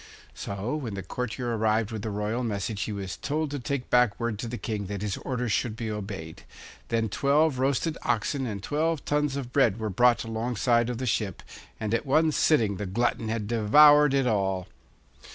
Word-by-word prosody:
So 100 Hz, +7 st, -4 dB
when 120 Hz, -9 st, -5 dB
the 95 Hz, -, -5 dB
courtier 120 Hz, +3 st, -3 dB
arrived 110 Hz, 0 st, +1 dB
with 110 Hz, -2 st, -4 dB
the 110 Hz, -, -4 dB
royal 105 Hz, +4 st, -2 dB
message 100 Hz, -2 st, -3 dB
he -, -, -2 dB
was 100 Hz, -2 st, -5 dB
told 155 Hz, 0 st, -2 dB
to 145 Hz, -, -3 dB
take 135 Hz, 0 st, -4 dB
back 125 Hz, -4 st, +3 dB
word 115 Hz, -3 st, -2 dB
to 120 Hz, -, -4 dB
the 120 Hz, +1 st, -4 dB
King 105 Hz, -5 st, -4 dB
that 100 Hz, 0 st, -4 dB
his 105 Hz, -2 st, -1 dB
orders 125 Hz, -3 st, -3 dB
should 110 Hz, +1 st, 0 dB
be 115 Hz, -1 st, -4 dB
obeyed. 95 Hz, -6 st, -6 dB, 0.5 s
Then 115 Hz, -1 st, 0 dB
twelve 140 Hz, +5 st, +2 dB
roasted 140 Hz, +4 st, 0 dB
oxen 130 Hz, +4 st, -1 dB
and 100 Hz, -3 st, -5 dB
twelve 155 Hz, +3 st, -1 dB
tons 150 Hz, -1 st, 0 dB
of 130 Hz, -3 st, -5 dB
bread 120 Hz, -7 st, +3 dB
were 110 Hz, -2 st, -2 dB
brought 120 Hz, +5 st, +3 dB
alongside 115 Hz, +1 st, 0 dB
of 120 Hz, -, -3 dB
the 130 Hz, -, -3 dB
ship, 105 Hz, -4 st, -1 dB, 0.4 s
and 110 Hz, 0 st, -2 dB
at 115 Hz, +5 st, -1 dB
one 155 Hz, +3 st, +3 dB
sitting 115 Hz, -11 st, +2 dB
the 100 Hz, -, -4 dB
glutton 115 Hz, +2 st, -1 dB
had 110 Hz, -2 st, -2 dB
devoured 145 Hz, +6 st, +6 dB
it 135 Hz, -1 st, +2 dB
all. 95 Hz, -5 st, 0 dB
115 Hz, 195 wpm, -27 LUFS, 105-135 Hz, 0.5 s, devoured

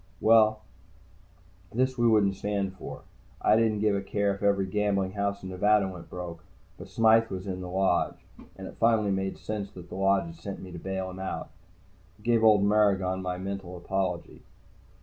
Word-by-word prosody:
Well, 110 Hz, -1 st, +5 dB, 1.1 s
this 130 Hz, +2 st, +1 dB
we 120 Hz, -2 st, +2 dB
wouldn't 105 Hz, -3 st, +4 dB
stand 100 Hz, -1 st, -2 dB
for. 95 Hz, -, -9 dB, 0.4 s
I 105 Hz, -, +4 dB
didn't 110 Hz, -2 st, +2 dB
give 105 Hz, -1 st, +2 dB
a 100 Hz, -, -1 dB
care 100 Hz, 0 st, 0 dB
if 100 Hz, -, -9 dB
every 100 Hz, -1 st, +2 dB
gambling 100 Hz, -1 st, 0 dB
house 100 Hz, 0 st, -2 dB
in 95 Hz, -, -6 dB
Nevada 105 Hz, +2 st, +3 dB
went 90 Hz, -2 st, -9 dB
broke. 85 Hz, -2 st, -7 dB, 0.4 s
But -, -, -9 dB
Smythe 115 Hz, 0 st, +4 dB
was 95 Hz, 0 st, -5 dB
in 95 Hz, -2 st, -4 dB
the 90 Hz, -, -6 dB
Lodge. 95 Hz, -1 st, 0 dB, 0.3 s
And -, -, -8 dB
it -, -, -10 dB
finally 110 Hz, -3 st, +3 dB
made 95 Hz, 0 st, -2 dB
sense 105 Hz, -2 st, -4 dB
that 90 Hz, -2 st, -11 dB
the -, -, -7 dB
Lodge 95 Hz, -, +2 dB
had 165 Hz, 0 st, -9 dB
sent 100 Hz, -10 st, -7 dB
me 95 Hz, -, -9 dB
to 85 Hz, -, -7 dB
bail 95 Hz, +1 st, -4 dB
him 95 Hz, -, -9 dB
out. 95 Hz, -, -5 dB, 0.7 s
I -, -, -21 dB
gave 115 Hz, -1 st, +2 dB
old 105 Hz, -2 st, +6 dB
Maragon 100 Hz, -3 st, +2 dB
my 90 Hz, -1 st, -3 dB
mental 95 Hz, -1 st, -5 dB
apology. 90 Hz, -1 st, -3 dB
100 Hz, 190 wpm, -28 LUFS, 95-105 Hz, 1.1 s, old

